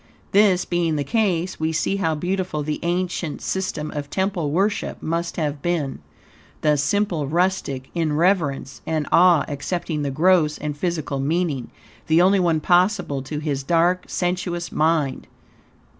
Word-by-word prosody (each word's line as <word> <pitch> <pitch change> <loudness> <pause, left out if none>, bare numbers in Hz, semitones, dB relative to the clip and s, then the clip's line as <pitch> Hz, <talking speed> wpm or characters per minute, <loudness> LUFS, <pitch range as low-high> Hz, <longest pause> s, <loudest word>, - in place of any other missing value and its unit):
This 195 -3 +4
being 170 -2 0
the 145 - 0
case, 180 - 0
we 160 0 0
see 160 +5 0
how 160 -5 0
beautiful 180 -1 -2
the 150 +1 -3
ancients' 175 -2 -2
system 185 -5 -2
of 145 -1 -5
temple 190 -4 -1
worship 195 +7 0
must 170 +1 -3
have 150 -3 -2
been. 160 -5 -1 0.6
The 150 -1 +3
simple 165 0 0
rustic, 165 -5 -1
in 165 -3 0
reverence 150 -7 0
and 155 -2 0
awe, 175 -3 +5
accepting 150 +2 -3
the 145 - -1
gross 155 +1 +3
and 150 -1 -4
physical 155 -4 -2
meaning 150 -3 -1 0.4
the 160 +1 +4
only 190 +2 +5
one 165 -3 +2
possible 180 -4 +2
to 140 +3 -5
his 150 -3 -2
dark, 170 +5 +2
sensuous 175 -1 -2
mind. 155 -3 0
165 Hz, 145 wpm, -22 LUFS, 150-180 Hz, 0.6 s, awe